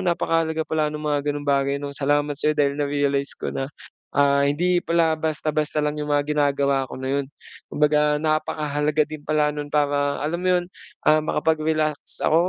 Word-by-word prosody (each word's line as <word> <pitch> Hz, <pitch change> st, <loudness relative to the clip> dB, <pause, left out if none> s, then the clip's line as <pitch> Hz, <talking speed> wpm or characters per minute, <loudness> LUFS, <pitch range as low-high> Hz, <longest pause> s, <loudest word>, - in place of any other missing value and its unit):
napakahalaga 165 Hz, -2 st, 0 dB
pala 155 Hz, -1 st, 0 dB
nung 150 Hz, 0 st, -4 dB
mga 145 Hz, 0 st, 0 dB
ganong 145 Hz, 0 st, -5 dB
bagay, 140 Hz, 0 st, +1 dB
'no? 140 Hz, -1 st, -6 dB
Salamat 145 Hz, 0 st, +1 dB
sayo 155 Hz, +1 st, +1 dB
dahil 145 Hz, -2 st, +1 dB
na-realize 140 Hz, -1 st, 0 dB
ko -, -, -4 dB
na, 135 Hz, 0 st, -3 dB, 0.5 s
ah, 140 Hz, 0 st, +4 dB
hindi 175 Hz, +4 st, +2 dB
pala 165 Hz, -1 st, +2 dB
basta-basta 155 Hz, -1 st, -1 dB
lang 150 Hz, 0 st, -2 dB
yung 150 Hz, -, -4 dB
mga 145 Hz, -1 st, +2 dB
ginagawa 140 Hz, -2 st, +1 dB
ko -, -, -8 dB
na 135 Hz, +2 st, -1 dB
yun. 140 Hz, -, -6 dB, 0.4 s
Kumbaga 150 Hz, 0 st, +2 dB
napakahalaga 150 Hz, -1 st, 0 dB
din 155 Hz, 0 st, -8 dB
pala 150 Hz, 0 st, +1 dB
nun 145 Hz, 0 st, -5 dB
para, 145 Hz, -1 st, +1 dB
alam 170 Hz, +3 st, -2 dB
mo 185 Hz, -, -1 dB
yun, 175 Hz, -, -1 dB, 0.4 s
ah, 155 Hz, 0 st, +5 dB
makapag-relax 155 Hz, -1 st, -1 dB
ako, 170 Hz, +3 st, +3 dB
150 Hz, 175 wpm, -23 LUFS, 145-155 Hz, 0.5 s, ah